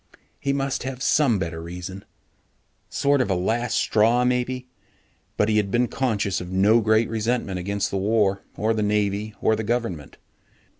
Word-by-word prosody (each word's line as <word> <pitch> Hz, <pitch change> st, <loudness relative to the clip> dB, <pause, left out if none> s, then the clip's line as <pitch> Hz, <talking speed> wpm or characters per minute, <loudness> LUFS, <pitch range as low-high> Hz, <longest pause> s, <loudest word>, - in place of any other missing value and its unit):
He 140 Hz, -, -1 dB
must 140 Hz, -1 st, -1 dB
have 130 Hz, 0 st, -5 dB
some 135 Hz, -8 st, +3 dB
better 80 Hz, -3 st, -4 dB
reason. 90 Hz, +3 st, -7 dB, 0.9 s
Sort 140 Hz, -1 st, +2 dB
of 120 Hz, -, -1 dB
a 95 Hz, -, +2 dB
last 115 Hz, +6 st, 0 dB
straw, 115 Hz, +3 st, +3 dB
maybe. 125 Hz, 0 st, -1 dB, 0.7 s
But 105 Hz, -, +3 dB
he 110 Hz, -1 st, +2 dB
had 105 Hz, -2 st, +1 dB
been 120 Hz, +4 st, +2 dB
conscious 105 Hz, -8 st, -1 dB
of 90 Hz, 0 st, -7 dB
no 105 Hz, +5 st, +4 dB
great 110 Hz, +1 st, +3 dB
resentment 115 Hz, -3 st, -1 dB
against 100 Hz, +3 st, -2 dB
the 100 Hz, -, -1 dB
war 100 Hz, -1 st, +1 dB, 0.2 s
or 110 Hz, +1 st, +1 dB
the 110 Hz, -, -1 dB
Navy 105 Hz, 0 st, 0 dB
or 110 Hz, -, +3 dB
the 110 Hz, -, -3 dB
government. 105 Hz, -, -3 dB
110 Hz, 165 wpm, -24 LUFS, 100-120 Hz, 0.9 s, no